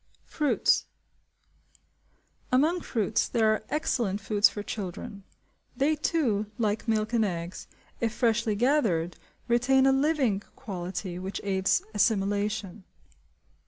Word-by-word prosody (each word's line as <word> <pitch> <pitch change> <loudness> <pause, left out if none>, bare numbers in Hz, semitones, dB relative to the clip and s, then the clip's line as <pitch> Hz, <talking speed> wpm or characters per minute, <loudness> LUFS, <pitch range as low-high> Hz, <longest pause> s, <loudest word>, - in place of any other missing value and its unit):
Fruits. 300 -2 +1 1.6
Among 310 +8 +3
fruits 220 -6 0
there 220 -2 +3
are 215 - -3
excellent 240 -10 0
foods 210 +1 +3
for 205 - -6
children. 200 +1 -6 0.5
They 290 +3 +2
too, 255 -9 0
like 215 0 -1
milk 215 0 0
and 230 -2 +3
eggs, 175 -2 -4 0.3
if 230 -1 0
freshly 230 -2 +1
gathered, 205 - +1 0.3
retain 250 +3 +3
a 270 - +5
living 270 -7 +2
quality 180 -5 -5
which 190 +1 -4
aids 190 -1 +1
assimilation. 205 -1 0
215 Hz, 110 wpm, -28 LUFS, 195-250 Hz, 1.6 s, a